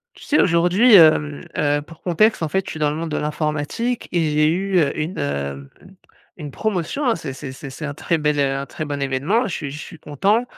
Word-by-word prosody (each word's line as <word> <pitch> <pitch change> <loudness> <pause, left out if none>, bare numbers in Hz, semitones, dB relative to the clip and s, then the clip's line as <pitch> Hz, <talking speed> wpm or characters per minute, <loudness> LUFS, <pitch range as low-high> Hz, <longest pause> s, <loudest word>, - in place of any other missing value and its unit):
Tu - - -14
sais 300 - +2
aujourd'hui, 180 +7 +4
hem, 155 -4 +5
heu, 145 0 +1
pour 160 +2 -15
contexte 190 +4 +2
en 160 - 0
fait 190 +5 -1
je - - -5
suis - - -7
dans 150 -1 +1
le 150 - -4
monde 165 0 -4
de 150 - -1
l'informatique 150 +10 -2
et 175 - +2
j'ai 150 0 +3
eu, 185 +3 +1
heu, 145 -4 +2
une, 155 +4 -3
heu, 70 0 -2
mmh, 70 - -16 0.4
une 150 -4 -7
promotion, 215 - -2
hein. 235 - +2
C'est 135 - -6
c'est 130 0 -8
c'est 135 +1 -9
c'est 150 +3 -6
un 145 - -5
très 165 +2 -1
bel, 150 -1 0
heu, 135 -1 +1
un 140 0 -4
très 155 - -6
bon 145 -1 -4
événement, 140 - 0
je - - -3
suis 145 -3 -5
je 150 - -7
suis 160 - -10
content. 200 - +1
155 Hz, 245 wpm, -21 LUFS, 145-185 Hz, 0.4 s, hem